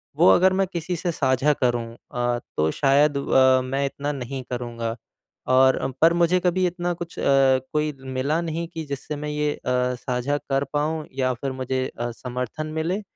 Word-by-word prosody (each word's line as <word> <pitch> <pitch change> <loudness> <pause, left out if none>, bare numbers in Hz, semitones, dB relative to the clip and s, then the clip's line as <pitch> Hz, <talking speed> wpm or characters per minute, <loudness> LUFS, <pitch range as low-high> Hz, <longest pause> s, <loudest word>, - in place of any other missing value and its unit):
वो - - +6
अगर 185 +1 +4
मैं 190 0 +1
किसी 175 +1 -2
से 175 +1 -2
साझा 135 0 +2
करूँ 120 -1 +1 0.3
अ, 120 0 0 0.2
तो 75 +1 +2
शायद 140 - +3
अ, 130 -1 +4
मैं 135 +2 -1
इतना 140 +1 -3
नहीं 130 -1 -5
करूँगा। 120 -2 -3 0.6
और 130 0 +5 0.2
पर 165 +1 +6
मुझे 170 +1 +3
कभी 180 +1 +1
इतना 175 0 -2
कुछ 170 0 -8
अ, - - -3 0.5
कोई 150 0 +1 0.2
मिला 140 +5 +1
नहीं 165 0 -3
कि 160 - -4
जिससे 140 +1 -5
मैं 150 +1 -5
ये 150 0 0
अ, - - -19 0.4
साझा 125 +3 -2
कर 135 -1 -1
पाऊँ 155 +1 -1
या 130 -1 +1
फिर 135 +3 -4
मुझे 130 0 -2
अ, 120 - -1
समर्थन 125 +5 -5
मिले। 175 +6 -1
140 Hz, 180 wpm, -24 LUFS, 130-160 Hz, 0.6 s, वो